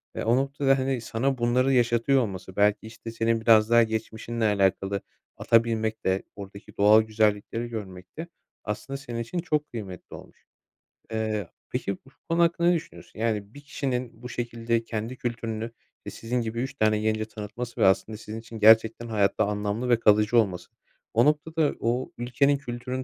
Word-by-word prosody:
eee, -, -, -3 dB
o 115 Hz, +2 st, +3 dB
noktada 135 Hz, 0 st, +2 dB
hani 130 Hz, -2 st, -1 dB
sana 130 Hz, +4 st, -1 dB
bunları 125 Hz, +3 st, +2 dB
yaşatıyor 120 Hz, +2 st, +3 dB
olması, 95 Hz, -3 st, -5 dB
belki 105 Hz, +1 st, +2 dB
işte 115 Hz, 0 st, -9 dB
senin 115 Hz, 0 st, 0 dB
biraz 110 Hz, -1 st, +5 dB
daha 120 Hz, 0 st, +6 dB
geçmişinle 110 Hz, +1 st, -3 dB
alakalı 100 Hz, -1 st, +1 dB, 0.4 s
ata 115 Hz, 0 st, +4 dB
binmek 110 Hz, -1 st, -2 dB
de, 95 Hz, +1 st, +1 dB
oradaki 100 Hz, 0 st, -11 dB
doğal 105 Hz, +2 st, +7 dB
güzellikleri 110 Hz, +1 st, 0 dB
görmek 95 Hz, -2 st, -8 dB
de 165 Hz, -, -5 dB, 0.4 s
aslında 135 Hz, +6 st, -4 dB
senin 120 Hz, -4 st, -6 dB
için 115 Hz, +10 st, -3 dB
çok 150 Hz, -3 st, -1 dB
kıymetli 100 Hz, -7 st, -8 dB
olmuş. -, -, -15 dB, 0.7 s
Eee, 110 Hz, -4 st, -2 dB, 0.2 s
peki 100 Hz, -, -2 dB
bu 135 Hz, -, -21 dB, 0.2 s
konu 170 Hz, +1 st, +3 dB
hakkında 170 Hz, 0 st, +2 dB
ne 175 Hz, -, +4 dB
düşünüyorsun? 160 Hz, -8 st, -8 dB
Yani 105 Hz, -2 st, -1 dB
bir 145 Hz, -, -11 dB
kişinin 125 Hz, -5 st, -4 dB
bu 125 Hz, -, -7 dB
şekilde 115 Hz, -1 st, -2 dB
kendi 115 Hz, +3 st, -5 dB
kültürünü, 115 Hz, -1 st, -4 dB, 0.3 s
i -, -, -5 dB
sizin 120 Hz, +2 st, -2 dB
gibi 115 Hz, +1 st, -3 dB
3 135 Hz, +1 st, -3 dB
tane 110 Hz, -3 st, +2 dB
gence 110 Hz, 0 st, 0 dB
tanıtması 110 Hz, +3 st, -7 dB
ve -, -, +6 dB
aslında 105 Hz, +3 st, +2 dB
sizin 110 Hz, 0 st, -7 dB
için 115 Hz, -1 st, -10 dB
gerçekten 110 Hz, +2 st, +5 dB
hayatta 105 Hz, -1 st, +1 dB
anlamlı 105 Hz, +4 st, -2 dB
ve 120 Hz, -2 st, +4 dB
kalıcı 105 Hz, +2 st, +4 dB
olması. 90 Hz, -6 st, 0 dB, 0.4 s
O 120 Hz, +2 st, +4 dB
noktada 150 Hz, +1 st, +1 dB
o 120 Hz, +3 st, -1 dB
ülkenin 140 Hz, +4 st, +2 dB
kültürünü 125 Hz, 0 st, -5 dB
115 Hz, 170 wpm, -26 LUFS, 110-125 Hz, 0.7 s, doğal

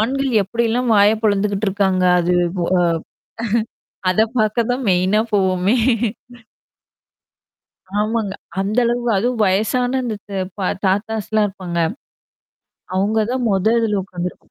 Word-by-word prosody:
ஆண்கள் 270 Hz, +4 st, 0 dB
எப்டிலாம் 235 Hz, +4 st, 0 dB
வாய 205 Hz, +1 st, +6 dB
பொழந்துக்கிட்டு 205 Hz, 0 st, +1 dB
இருக்காங்க 190 Hz, -1 st, +1 dB, 0.2 s
அது 175 Hz, +1 st, +1 dB, 0.3 s
அ-அ 180 Hz, 0 st, +2 dB, 1.3 s
அத 185 Hz, -, +1 dB, 0.2 s
பார்க்க 220 Hz, +2 st, +1 dB
தான் 250 Hz, +1 st, -1 dB
மெயினா 185 Hz, +4 st, +3 dB
போவோமே! 190 Hz, +1 st, +2 dB, 2.3 s
ஆமாங்க. 215 Hz, -2 st, -1 dB, 0.3 s
அந்த 205 Hz, +4 st, -1 dB
அளவு 240 Hz, +1 st, -1 dB
அதுவும் 235 Hz, +2 st, 0 dB
வயசான 245 Hz, +7 st, +1 dB
அந்த 225 Hz, -3 st, -3 dB
த -, -, -7 dB, 0.2 s
பா 190 Hz, -2 st, -1 dB, 0.2 s
தாத்தாஸ்லாம் 215 Hz, +1 st, 0 dB
இருப்பாங்க. 185 Hz, -3 st, -6 dB, 1.2 s
அவங்க 205 Hz, +4 st, +1 dB
தான் 255 Hz, -1 st, -1 dB
மொதத்துல 215 Hz, +1 st, +2 dB
உட்காந்துருப்பாங்க. 180 Hz, -1 st, -7 dB
210 Hz, 110 wpm, -19 LUFS, 190-230 Hz, 2.3 s, வாய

